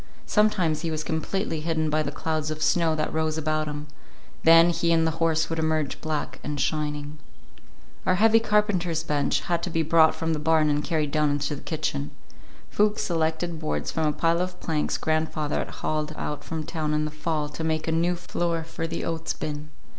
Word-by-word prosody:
Sometimes 185 Hz, -8 st, +2 dB
he 165 Hz, -, -2 dB
was 155 Hz, -1 st, -2 dB
completely 160 Hz, +2 st, -2 dB
hidden 160 Hz, -1 st, 0 dB
by 155 Hz, +1 st, +2 dB
the 145 Hz, -2 st, -2 dB
clouds 155 Hz, 0 st, -2 dB
of 155 Hz, 0 st, -3 dB
snow 165 Hz, -2 st, +3 dB
that 155 Hz, -, -2 dB
rose 160 Hz, 0 st, 0 dB
about 155 Hz, 0 st, 0 dB
him; 150 Hz, 0 st, -5 dB, 0.6 s
then 165 Hz, +1 st, +7 dB
he 170 Hz, 0 st, +1 dB
and 165 Hz, -1 st, +4 dB
the 160 Hz, -, +2 dB
horses 160 Hz, -1 st, +2 dB
would 165 Hz, -, -1 dB
emerge 155 Hz, -2 st, 0 dB
black 155 Hz, -2 st, -3 dB
and 150 Hz, -1 st, -3 dB
shining. 150 Hz, +1 st, -2 dB, 0.9 s
Our 185 Hz, -, +4 dB
heavy 225 Hz, +3 st, +5 dB
carpenter's 205 Hz, -7 st, +1 dB
bench 150 Hz, -3 st, +1 dB
had 170 Hz, -1 st, -1 dB
to 180 Hz, -, -3 dB
be 165 Hz, -1 st, +1 dB
brought 160 Hz, 0 st, +5 dB
from 165 Hz, 0 st, -1 dB
the 155 Hz, -, -1 dB
barn 155 Hz, 0 st, +3 dB
and 145 Hz, 0 st, 0 dB
carried 155 Hz, -3 st, 0 dB
down 150 Hz, 0 st, +2 dB
into 145 Hz, +1 st, -1 dB
the -, -, -9 dB
kitchen. 150 Hz, -, -2 dB, 0.6 s
Fuchs 210 Hz, +1 st, +2 dB
selected 165 Hz, -2 st, -1 dB
boards 155 Hz, -1 st, -2 dB
from 160 Hz, -1 st, 0 dB
a -, -, +3 dB
pile 165 Hz, +3 st, +1 dB
of 180 Hz, 0 st, -4 dB
planks 155 Hz, -2 st, -1 dB
grandfather 155 Hz, -1 st, -1 dB
had -, -, -3 dB
hauled 155 Hz, 0 st, -3 dB
out 150 Hz, -, -4 dB
from 160 Hz, -1 st, -4 dB
town 155 Hz, -1 st, -2 dB
in 150 Hz, 0 st, +1 dB
the 150 Hz, -, -4 dB
fall 155 Hz, 0 st, -2 dB
to 155 Hz, +2 st, -6 dB
make 160 Hz, 0 st, -1 dB
a -, -, +1 dB
new 170 Hz, +2 st, +2 dB
floor 170 Hz, -1 st, -2 dB
for 165 Hz, 0 st, -4 dB
the 165 Hz, 0 st, -4 dB
oats 165 Hz, -1 st, -2 dB
bin. 150 Hz, 0 st, -5 dB
160 Hz, 200 wpm, -26 LUFS, 155-165 Hz, 0.9 s, then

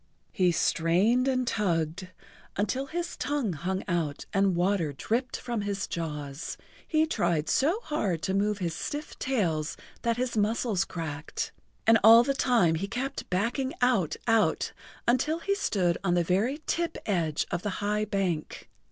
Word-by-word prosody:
He 180 Hz, -2 st, +3 dB
strained 185 Hz, +10 st, +2 dB
and 255 Hz, -1 st, +1 dB
tugged 175 Hz, -5 st, 0 dB, 0.5 s
until 215 Hz, +7 st, -1 dB
his 345 Hz, +2 st, -3 dB
tongue 280 Hz, -9 st, -1 dB
hung 185 Hz, +5 st, -2 dB
out 165 Hz, -6 st, -1 dB
and 195 Hz, -2 st, +3 dB
water 175 Hz, -4 st, +1 dB
dripped 240 Hz, -, -1 dB
from 235 Hz, -3 st, -3 dB
his 200 Hz, -1 st, -2 dB
jaws, 150 Hz, -3 st, -5 dB, 0.3 s
he 315 Hz, -1 st, +3 dB
tried 170 Hz, -, 0 dB
so 325 Hz, +10 st, +2 dB
hard 195 Hz, -, -1 dB
to 190 Hz, -, 0 dB
move 205 Hz, +1 st, +1 dB
his 175 Hz, -4 st, -2 dB
stiff 295 Hz, -, -5 dB
tails 170 Hz, -, 0 dB, 0.2 s
that 235 Hz, -1 st, 0 dB
his 245 Hz, -1 st, -1 dB
muscles 210 Hz, -2 st, +1 dB
cracked, 160 Hz, -3 st, -4 dB, 0.3 s
and 225 Hz, 0 st, +6 dB
all 225 Hz, +2 st, +9 dB
the 275 Hz, +2 st, +1 dB
time 235 Hz, -11 st, +3 dB
he 165 Hz, +5 st, -2 dB
kept 260 Hz, +5 st, -4 dB
backing 240 Hz, +9 st, -1 dB
out, 215 Hz, -11 st, +2 dB
out, 225 Hz, -2 st, +2 dB, 0.3 s
until 260 Hz, +7 st, +2 dB
he 395 Hz, +4 st, -1 dB
stood 190 Hz, -, 0 dB
on 175 Hz, -2 st, +2 dB
the 175 Hz, -, +3 dB
very 220 Hz, -, 0 dB
tip 340 Hz, -1 st, -1 dB
edge 165 Hz, -7 st, 0 dB
of -, -, -1 dB
the 205 Hz, -, -2 dB, 0.2 s
high 210 Hz, +1 st, +1 dB
bank. 190 Hz, -6 st, -2 dB
205 Hz, 155 wpm, -28 LUFS, 170-250 Hz, 0.5 s, all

